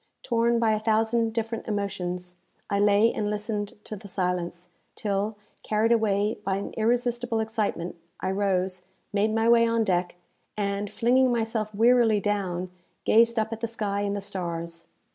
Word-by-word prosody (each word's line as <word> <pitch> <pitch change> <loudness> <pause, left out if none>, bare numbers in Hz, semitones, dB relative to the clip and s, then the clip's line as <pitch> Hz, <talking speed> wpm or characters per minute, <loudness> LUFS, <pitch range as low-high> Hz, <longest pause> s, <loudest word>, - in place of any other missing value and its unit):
Torn 235 0 +2
by 230 -1 +3
a 215 - +1
thousand 225 +1 +1
different 230 0 -3
emotions, 180 -4 -3 0.4
I 200 - +2
lay 205 +2 +4
and 210 -1 -1
listened 210 0 -3
to 215 - -6
the 200 0 -11
silence, 180 -2 -2 0.3
till, 205 +1 -2 0.2
carried 220 +2 +1
away 210 -2 +2
by 195 -1 0
an 200 - -4
irresistible 240 +1 0
excitement, 215 -6 -2 0.2
I 190 - -1
rose, 190 -2 0 0.3
made 210 +2 +2
my 225 +1 +1
way 230 0 +6
on 230 0 +2
deck, 180 -3 0 0.4
and, 200 0 -1
flinging 255 +4 +3
myself 225 -2 -1
wearily 230 -1 +4
down, 185 -3 -2 0.3
gazed 230 +1 +4
up 220 +1 0
at 225 - -6
the 230 - -2
sky 210 -3 -2
and 205 0 -1
the 200 - -3
stars. 170 -3 -4
210 Hz, 160 wpm, -26 LUFS, 195-225 Hz, 0.4 s, way